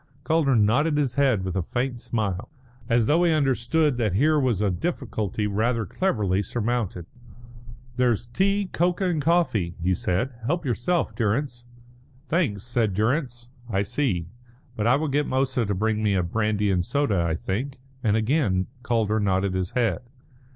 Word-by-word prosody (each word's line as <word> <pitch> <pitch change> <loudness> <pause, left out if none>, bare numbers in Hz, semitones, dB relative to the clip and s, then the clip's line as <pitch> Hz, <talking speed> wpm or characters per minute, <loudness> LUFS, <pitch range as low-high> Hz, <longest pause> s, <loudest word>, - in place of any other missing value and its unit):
Calder 155 -5 +2
nodded 130 +9 +3
his 140 -5 +1
head 130 -8 +2
with 95 -2 -3
a 95 - +1
faint 120 +6 -3
smile, 105 -2 -2 0.4
as 115 -1 +3
though 160 +8 +3
he 170 - +4
understood 145 0 +1
that 110 -6 0
here 150 +7 +3
was 125 -7 +1
a 105 -2 +1
difficulty 110 - -2
rather 110 +3 0
cleverly 100 - 0
surmounted. 110 -4 -2 0.9
"There's 120 -2 +2
tea, 195 +11 0
cocoa, 180 +3 +1
and 155 -3 -1
coffee," 140 - +1
he 90 +2 +1
said. 95 +9 -1
"Help 170 +2 -1
yourself, 140 +7 0
Durrance." 120 +2 -1 0.6
"Thanks," 140 - 0
said 115 -5 0
Durrance. 120 - -1 0.2
"I 100 -2 +1
see, 100 - -1 0.5
but 105 +1 0
I 120 - +5
will 155 +3 -1
get 145 +1 0
Moussa 130 -3 0
to 100 - 0
bring 110 +2 0
me 105 -2 +2
a 90 - +1
brandy 105 +2 0
and 90 -2 +1
soda, 110 -5 0
I 85 -1 0
think," 125 - -3 0.3
and 110 -2 +2
again 110 -6 +1 0.2
Calder 115 -4 +1
nodded 95 -1 +1
his 95 -1 -1
head. 115 -8 +1
120 Hz, 160 wpm, -25 LUFS, 100-140 Hz, 0.9 s, I